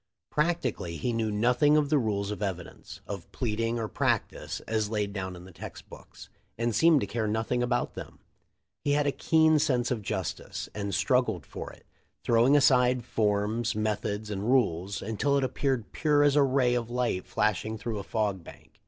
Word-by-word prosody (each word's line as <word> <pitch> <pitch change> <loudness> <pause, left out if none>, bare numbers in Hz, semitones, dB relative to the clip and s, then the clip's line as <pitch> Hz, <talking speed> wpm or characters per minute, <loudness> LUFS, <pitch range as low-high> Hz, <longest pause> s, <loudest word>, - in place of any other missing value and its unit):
Practically 145 - -1
he 120 +10 -1
knew 115 -1 0
nothing 125 +8 +3
of 145 -2 +1
the 150 -1 +3
rules 100 -4 -1
of 105 - -5
evidence, 95 -4 -6
of - - -7
pleading, 115 0 -1
or 115 -2 -2
practice, - - -1
as 110 -2 -1
laid 105 -2 -2
down 95 -2 -4
in 90 - -11
the 95 - -13
text 80 - -10
books, - - -13 0.3
and 115 0 0
seemed 155 +5 +5
to - - 0
care 110 +2 -2
nothing 110 +3 0
about 120 0 0
them. - - -9 0.7
He 145 - +2
had 145 0 +2
a 140 - +2
keen 160 +1 +3
sense 130 -6 +1
of 120 -3 -1
justice, 95 -9 -4
and 100 -1 -3
strug 125 +4 +2
gled 90 -10 -4
for - - -7
it, - - -18 0.4
throwing 120 +5 +4
aside 125 -3 +4
forms, 110 +2 0
methods, 105 0 -2
and 100 +3 -2
rules, 100 -7 +1
until 125 +7 0
it 140 - +1
appeared 130 -2 -1
pure 150 -2 +2
as 145 -1 +4
a 145 - +5
ray 130 -2 +3
of 120 -2 -1
light 120 -6 -1
flash 105 -1 +1
ing 110 +1 -4
through 110 0 -4
a - - -5
fog 100 -3 -1
bank. - - -15
115 Hz, 190 wpm, -28 LUFS, 105-130 Hz, 0.7 s, seemed